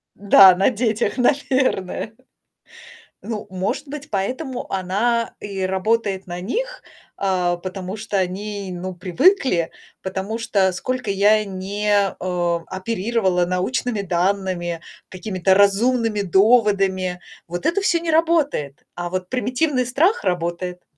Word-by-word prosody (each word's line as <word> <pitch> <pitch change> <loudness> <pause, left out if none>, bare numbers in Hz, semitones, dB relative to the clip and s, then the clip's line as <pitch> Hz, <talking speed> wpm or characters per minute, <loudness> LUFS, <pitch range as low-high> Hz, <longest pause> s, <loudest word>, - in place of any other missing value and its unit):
Да, 195 -2 +7
на 190 +2 +3
детях, 230 0 -1
наверное. 255 -6 0 1.1
Ну, 220 -3 -5
может 190 +10 -3
быть, 285 0 -8
поэтому 250 +6 -3
она 210 +5 0
и 195 -2 -5
работает 190 +1 0
на 175 0 -5
них, - - -4 0.3
а, 180 -3 0
потому 185 +2 -6
что 215 -1 -3
они, 200 +2 -3
ну, 180 +1 -5
привыкли, 180 - +2 0.3
потому 190 +4 -3
что, 200 -4 +1
сколько 250 +4 -3
я 205 +2 +4
не, 200 +2 -3
а, 180 -4 0
оперировала 190 -2 0
научными 205 +4 -1
данными, 180 -2 -1 0.3
какими-то 190 0 0
разумными 215 +2 +3
доводами, 195 -2 +2 0.3
вот 175 +1 -5
это 390 +4 +2
всё 345 -3 +2
не 335 -1 -2
работает, 310 - +1
а 175 0 -4
вот 185 0 -4
примитивный 255 +3 0
страх 345 - +2
работает. 180 +1 -2
200 Hz, 115 wpm, -21 LUFS, 185-235 Hz, 1.1 s, Да